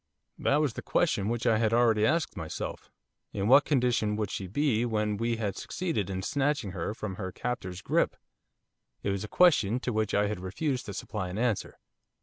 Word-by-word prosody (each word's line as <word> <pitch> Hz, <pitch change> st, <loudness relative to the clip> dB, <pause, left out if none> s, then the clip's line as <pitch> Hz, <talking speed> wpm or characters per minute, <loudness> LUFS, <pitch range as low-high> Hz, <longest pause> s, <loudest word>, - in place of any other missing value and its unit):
That 145 Hz, +2 st, +2 dB
was 145 Hz, -6 st, 0 dB
the -, -, -6 dB
question 100 Hz, +1 st, +1 dB
which 120 Hz, +1 st, -2 dB
I 115 Hz, -2 st, +4 dB
had 110 Hz, -1 st, +2 dB
already 115 Hz, -2 st, +4 dB
asked 165 Hz, +1 st, 0 dB
myself, 80 Hz, -5 st, -5 dB, 0.4 s
in 100 Hz, 0 st, -1 dB
what 135 Hz, +4 st, +7 dB
condition 125 Hz, -6 st, +1 dB
would 105 Hz, -2 st, -2 dB
she 95 Hz, -, -4 dB
be 120 Hz, +2 st, +1 dB
when 105 Hz, -3 st, 0 dB
we 115 Hz, +2 st, 0 dB
had 105 Hz, -3 st, -2 dB
succeeded 160 Hz, -, -2 dB
in 95 Hz, -1 st, -3 dB
snatching 140 Hz, -5 st, 0 dB
her 90 Hz, +3 st, -3 dB
from 100 Hz, -4 st, -5 dB
her 95 Hz, -3 st, -4 dB
captor's 95 Hz, -6 st, -4 dB
grip? -, -, +1 dB, 0.9 s
It 100 Hz, -, 0 dB
was 100 Hz, 0 st, -2 dB
a -, -, -5 dB
question 125 Hz, -, +4 dB
to 125 Hz, -, -2 dB
which 110 Hz, -1 st, 0 dB
I 100 Hz, -, +3 dB
had 105 Hz, -2 st, -2 dB
refused 125 Hz, -, -2 dB
to 100 Hz, -, -5 dB
supply 95 Hz, -1 st, -4 dB
an 90 Hz, -, -5 dB
answer. 115 Hz, -3 st, -1 dB
110 Hz, 195 wpm, -29 LUFS, 100-125 Hz, 0.9 s, what